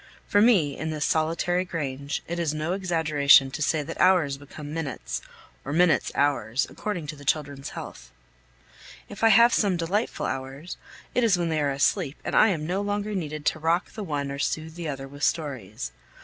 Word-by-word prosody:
For 205 Hz, -, +3 dB
me, 185 Hz, -, +4 dB
in 160 Hz, -, -4 dB
this 155 Hz, -1 st, -1 dB
solitary 165 Hz, +3 st, +1 dB
grange, 145 Hz, -5 st, -4 dB
it 170 Hz, +1 st, -3 dB
is 155 Hz, -3 st, -1 dB
no 155 Hz, +3 st, -1 dB
exaggeration 155 Hz, -7 st, +4 dB
to 155 Hz, -, -5 dB
say 150 Hz, 0 st, +1 dB
that -, -, -5 dB
hours 175 Hz, -7 st, +4 dB
become 145 Hz, +1 st, -9 dB
minutes, 160 Hz, -5 st, -4 dB, 0.4 s
or 140 Hz, -, -5 dB
minutes 170 Hz, +2 st, +3 dB
hours, 140 Hz, -3 st, +1 dB
according 195 Hz, -7 st, -4 dB
to 150 Hz, +1 st, -6 dB
the 145 Hz, -, -13 dB
children's 145 Hz, -2 st, -1 dB
health. -, -, -8 dB, 1.0 s
If 205 Hz, -, -8 dB
I 225 Hz, -, +7 dB
have 235 Hz, +3 st, +7 dB
some 195 Hz, -4 st, +2 dB
delightful 190 Hz, +7 st, -1 dB
hours, 135 Hz, +6 st, -5 dB, 0.4 s
it 250 Hz, -, +2 dB
is 215 Hz, -5 st, +4 dB
when 170 Hz, -1 st, -1 dB
they 155 Hz, -1 st, 0 dB
are 145 Hz, -, +1 dB
asleep 140 Hz, +2 st, +1 dB
and -, -, -3 dB
I -, -, +7 dB
am 165 Hz, -7 st, -1 dB
no 185 Hz, +4 st, -1 dB
longer 205 Hz, +1 st, -2 dB
needed 155 Hz, -5 st, -4 dB
to 155 Hz, -, +1 dB
rock 165 Hz, +3 st, 0 dB
the 215 Hz, -, -6 dB
one 145 Hz, -5 st, -3 dB
or 140 Hz, -, -5 dB
soothe 160 Hz, +1 st, -2 dB
the 170 Hz, -1 st, -6 dB
other 135 Hz, -2 st, -5 dB
with 145 Hz, +1 st, -12 dB
stories. 115 Hz, -, -2 dB
155 Hz, 190 wpm, -26 LUFS, 140-180 Hz, 1.0 s, I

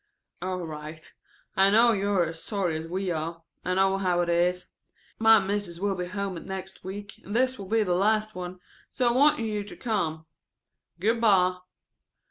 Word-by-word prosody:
("All 185 Hz, -1 st, -3 dB
right. 155 Hz, 0 st, -9 dB, 0.4 s
I 195 Hz, +1 st, +6 dB
know 230 Hz, +3 st, +6 dB
you 200 Hz, -2 st, 0 dB
are 190 Hz, -4 st, +3 dB
as 165 Hz, 0 st, -7 dB
sorry 195 Hz, -6 st, -1 dB
as 160 Hz, +1 st, -4 dB
we 185 Hz, +2 st, -2 dB
are. 165 Hz, +1 st, -4 dB, 0.2 s
I 185 Hz, -, -1 dB
know 195 Hz, 0 st, +3 dB
how 180 Hz, -2 st, +1 dB
it 175 Hz, -, -1 dB
is. 175 Hz, +1 st, +1 dB, 0.5 s
My 225 Hz, 0 st, +7 dB
Mis'es 195 Hz, -3 st, -3 dB
will 200 Hz, +1 st, 0 dB
be 180 Hz, -1 st, -3 dB
at -, -, -9 dB
home 200 Hz, -4 st, -3 dB
next 190 Hz, 0 st, -7 dB
week 200 Hz, +1 st, -8 dB
and 205 Hz, -, -6 dB
this 255 Hz, 0 st, +2 dB
will 195 Hz, -, -7 dB
be 225 Hz, 0 st, +3 dB
the 180 Hz, -3 st, 0 dB
last 215 Hz, +3 st, +2 dB
one, 180 Hz, 0 st, -6 dB, 0.3 s
so 250 Hz, -, 0 dB
I -, -, +3 dB
wanted 265 Hz, 0 st, +4 dB
you 210 Hz, -2 st, -2 dB
to 205 Hz, -, -10 dB
come. 165 Hz, -9 st, -2 dB, 0.7 s
Good 225 Hz, +5 st, +1 dB
by.") 185 Hz, -5 st, +4 dB
190 Hz, 190 wpm, -27 LUFS, 175-210 Hz, 0.7 s, My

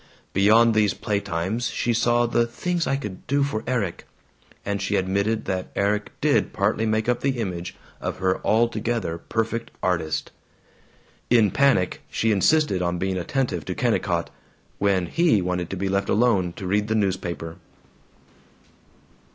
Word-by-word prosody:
Beyond 110 Hz, +4 st, +5 dB
these 105 Hz, -2 st, +2 dB
playtimes 100 Hz, +2 st, -2 dB
she 120 Hz, -, 0 dB
saw 120 Hz, +1 st, +2 dB
the 120 Hz, 0 st, +1 dB
"things 175 Hz, +8 st, -2 dB
I 135 Hz, -, +1 dB
could 105 Hz, -9 st, -7 dB
do 140 Hz, +2 st, +2 dB
for 125 Hz, -6 st, -2 dB
Erik" 115 Hz, -9 st, -2 dB, 0.6 s
and 100 Hz, 0 st, -2 dB
she 100 Hz, -, 0 dB
admitted 100 Hz, +4 st, 0 dB
that 95 Hz, -1 st, -3 dB
Erik 105 Hz, +1 st, 0 dB
did -, -, +2 dB
partly 115 Hz, -, +1 dB
make 110 Hz, +1 st, 0 dB
up 125 Hz, 0 st, +1 dB
the 135 Hz, -2 st, 0 dB
image 90 Hz, -5 st, -4 dB, 0.2 s
of -, -, -4 dB
her 95 Hz, -1 st, 0 dB
altogether 115 Hz, -5 st, 0 dB
perfect 115 Hz, +4 st, -2 dB
artist. 85 Hz, -4 st, -1 dB, 1.0 s
In 115 Hz, -5 st, +4 dB
panic 135 Hz, -10 st, +2 dB
she 115 Hz, -, +1 dB
insisted 105 Hz, -, +3 dB
on 90 Hz, 0 st, 0 dB
being 95 Hz, +1 st, -1 dB
attentive 95 Hz, -, -1 dB
to -, -, -4 dB
Kennicott, -, -, 0 dB, 0.5 s
when 95 Hz, -3 st, +2 dB
he 165 Hz, -, +3 dB
wanted 90 Hz, -1 st, -2 dB
to 95 Hz, -, -4 dB
be 95 Hz, +2 st, -1 dB
left 100 Hz, +1 st, 0 dB
alone 100 Hz, -6 st, +2 dB
to 95 Hz, -, -8 dB
read 105 Hz, +3 st, +1 dB
the 110 Hz, -, 0 dB
newspaper. 90 Hz, -4 st, -2 dB
105 Hz, 150 wpm, -24 LUFS, 95-115 Hz, 1.0 s, Beyond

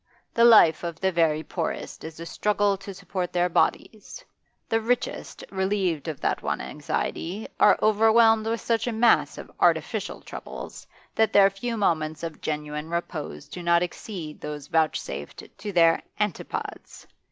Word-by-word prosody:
The 235 Hz, -, +5 dB
life 215 Hz, -10 st, +7 dB
of 170 Hz, -2 st, -5 dB
the 190 Hz, 0 st, +1 dB
very 160 Hz, -3 st, +2 dB
poorest 165 Hz, -1 st, -4 dB
is 160 Hz, 0 st, -8 dB
a 165 Hz, -, -6 dB
struggle 205 Hz, +2 st, +1 dB
to 195 Hz, +1 st, -9 dB
support 185 Hz, -1 st, -4 dB
their 175 Hz, 0 st, +1 dB
bodies; 220 Hz, -, -1 dB, 0.4 s
the 225 Hz, 0 st, +1 dB
richest, 245 Hz, +3 st, -2 dB
relieved 190 Hz, -5 st, -1 dB
of 155 Hz, -4 st, -4 dB
that -, -, 0 dB
one -, -, -2 dB
anxiety, 195 Hz, +6 st, -4 dB
are 210 Hz, -, +6 dB
overwhelmed 220 Hz, +1 st, +5 dB
with 230 Hz, +1 st, -1 dB
such 230 Hz, +1 st, 0 dB
a -, -, 0 dB
mass 230 Hz, +1 st, +3 dB
of -, -, -9 dB
artificial -, -, +1 dB
troubles -, -, -9 dB, 0.3 s
that 220 Hz, 0 st, +2 dB
their 195 Hz, -1 st, +6 dB
few 230 Hz, +4 st, -4 dB
moments 160 Hz, -6 st, 0 dB
of 165 Hz, -2 st, -6 dB
genuine 150 Hz, 0 st, -4 dB
repose 170 Hz, -4 st, -4 dB
do 170 Hz, +5 st, -8 dB
not 170 Hz, 0 st, +3 dB
exceed 175 Hz, -3 st, -7 dB
those 150 Hz, -2 st, -6 dB
vouchsafed 145 Hz, -, -2 dB, 0.2 s
to 205 Hz, -, -5 dB
their 165 Hz, -3 st, +4 dB, 0.2 s
antipodes. 210 Hz, -3 st, -4 dB
180 Hz, 150 wpm, -25 LUFS, 160-215 Hz, 0.4 s, life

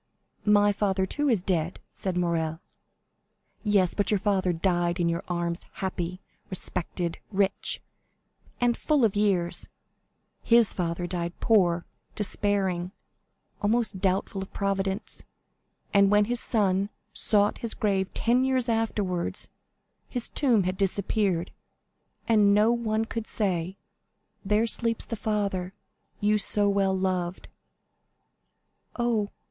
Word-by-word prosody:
"My 205 Hz, 0 st, +5 dB
father, 195 Hz, -2 st, 0 dB
too, 290 Hz, +9 st, -1 dB
is 215 Hz, -8 st, +2 dB
dead," 175 Hz, -2 st, -1 dB
said 185 Hz, -2 st, -3 dB
Morrel. 165 Hz, -2 st, 0 dB, 1.0 s
"Yes; 200 Hz, -5 st, +2 dB
but 205 Hz, -, +1 dB
your 210 Hz, -, +4 dB
father 190 Hz, -2 st, +1 dB
died 175 Hz, 0 st, 0 dB
in 170 Hz, -, +2 dB
your 170 Hz, +1 st, -2 dB
arms, 170 Hz, -1 st, -3 dB
happy, 185 Hz, -1 st, -4 dB, 0.3 s
respected, 175 Hz, -2 st, -3 dB
rich, 195 Hz, -1 st, 0 dB, 0.8 s
and 245 Hz, -1 st, +2 dB
full 295 Hz, -6 st, +2 dB
of 210 Hz, -, 0 dB
years; 195 Hz, -4 st, +1 dB, 0.7 s
his 235 Hz, -2 st, +4 dB
father 175 Hz, -1 st, -2 dB
died 175 Hz, -1 st, -4 dB
poor, 180 Hz, -6 st, +3 dB, 0.3 s
despairing, 195 Hz, -3 st, -1 dB, 0.7 s
almost 215 Hz, -1 st, +1 dB
doubtful 195 Hz, 0 st, 0 dB
of 195 Hz, -, -8 dB
Providence; 195 Hz, -1 st, -2 dB, 0.7 s
and 200 Hz, -1 st, +5 dB
when 210 Hz, 0 st, +4 dB
his 240 Hz, +2 st, 0 dB
son 200 Hz, -4 st, +1 dB, 0.2 s
sought 205 Hz, -1 st, +3 dB
his 230 Hz, -, -2 dB
grave 195 Hz, -4 st, 0 dB
ten 245 Hz, +2 st, +2 dB
years 260 Hz, -2 st, +1 dB
afterwards, 210 Hz, -6 st, -1 dB, 0.6 s
his 245 Hz, -2 st, -2 dB
tomb 240 Hz, -8 st, +3 dB
had 185 Hz, +1 st, -2 dB
disappeared, 195 Hz, -2 st, 0 dB, 0.8 s
and 210 Hz, -3 st, +5 dB
no 215 Hz, +2 st, +4 dB
one 225 Hz, -2 st, 0 dB
could 225 Hz, 0 st, -5 dB
say, 185 Hz, -3 st, -1 dB, 0.7 s
'There 210 Hz, +2 st, +2 dB
sleeps 230 Hz, 0 st, +3 dB
the 230 Hz, -, -4 dB
father 200 Hz, -4 st, -2 dB, 0.4 s
you 210 Hz, +1 st, +2 dB
so 205 Hz, 0 st, +2 dB
well 195 Hz, -1 st, +2 dB
loved.'" 185 Hz, -1 st, -2 dB, 1.5 s
"Oh!" 230 Hz, -4 st, 0 dB
200 Hz, 120 wpm, -27 LUFS, 180-215 Hz, 1.5 s, My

